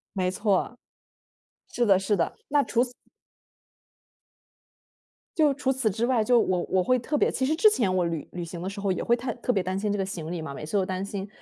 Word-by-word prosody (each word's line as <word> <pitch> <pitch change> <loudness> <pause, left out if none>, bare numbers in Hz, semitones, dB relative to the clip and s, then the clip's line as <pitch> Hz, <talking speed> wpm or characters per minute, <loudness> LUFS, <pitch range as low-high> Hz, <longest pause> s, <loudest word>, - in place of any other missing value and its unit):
没 185 -1 +1
错。 205 +4 0 0.9
是 240 - +1
的 195 -3 +5
是 200 +2 +1
的， 170 - -1
那 290 -1 +3
除 240 - +2
此 250 -1 -4 2.4
就 305 -3 +4
除 270 -1 -1
此 260 -4 0
之 220 +5 -1
外， 245 -3 +2
就 245 +2 +4
我 180 -4 0
我 185 - +3
会 255 +7 +2
特 270 +5 -2
别 - - +2
其 260 - -1
实 305 - +1
之 425 +7 +6
前 220 - +1
我 180 -1 +2
旅 165 -3 -3
旅 175 -1 -4
行 170 +1 -7
的 180 - -4
时 200 +1 -6
候 200 -1 0
也 - - -3
会 235 - +3
太 245 0 -3
特 250 +1 -1
别 195 - +1
担 185 +1 -2
心 205 0 -1
这 205 - -1
个 195 - 0
行 170 -4 -6
李 170 -2 -4
嘛， 155 - -6
每 150 - -7
次 160 +7 -2
都 195 - +2
担 185 +1 -3
心。 200 0 -5
200 Hz, 250 characters per minute, -26 LUFS, 185-245 Hz, 2.4 s, 之